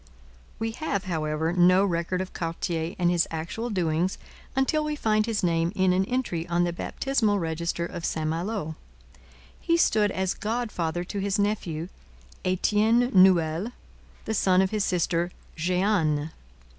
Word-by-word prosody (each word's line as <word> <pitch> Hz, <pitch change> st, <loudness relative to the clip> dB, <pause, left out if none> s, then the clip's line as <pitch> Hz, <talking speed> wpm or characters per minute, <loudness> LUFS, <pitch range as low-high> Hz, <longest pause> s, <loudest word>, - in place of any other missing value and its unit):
We 225 Hz, 0 st, -2 dB
have, 225 Hz, -6 st, -2 dB
however, 160 Hz, -2 st, -1 dB
no 180 Hz, +2 st, +5 dB
record 175 Hz, 0 st, -1 dB
of 185 Hz, -, -6 dB
Cartier 165 Hz, 0 st, -3 dB
and 175 Hz, -2 st, +2 dB
his 175 Hz, -1 st, +2 dB
actual 170 Hz, +9 st, -4 dB
doings 175 Hz, -2 st, 0 dB, 0.4 s
until 270 Hz, +4 st, +2 dB
we 300 Hz, 0 st, -2 dB
find 215 Hz, -5 st, +1 dB
his 225 Hz, -4 st, -1 dB
name 165 Hz, -1 st, +1 dB
in 185 Hz, -1 st, +3 dB
an 190 Hz, +1 st, +2 dB
entry 210 Hz, -9 st, -2 dB
on 175 Hz, 0 st, +1 dB
the 175 Hz, -1 st, 0 dB
baptismal 220 Hz, +2 st, 0 dB
register 170 Hz, 0 st, -2 dB
of 170 Hz, -1 st, -7 dB
St 155 Hz, -2 st, -1 dB
Malo. 165 Hz, 0 st, -2 dB, 0.8 s
He 335 Hz, -, +2 dB
stood 215 Hz, -10 st, +3 dB
as 190 Hz, -1 st, -1 dB
godfather 210 Hz, -7 st, -2 dB
to 200 Hz, +3 st, -5 dB
his 195 Hz, 0 st, 0 dB
nephew, 185 Hz, -6 st, -1 dB, 0.6 s
Etienne 215 Hz, +6 st, +2 dB
Nouel, 185 Hz, +2 st, +4 dB, 0.5 s
the 220 Hz, -, -2 dB
son 190 Hz, -3 st, +4 dB
of 190 Hz, -, -1 dB
his 215 Hz, -2 st, 0 dB
sister 175 Hz, -1 st, 0 dB, 0.3 s
Jehanne. 165 Hz, -3 st, +1 dB
185 Hz, 145 wpm, -26 LUFS, 170-210 Hz, 0.8 s, no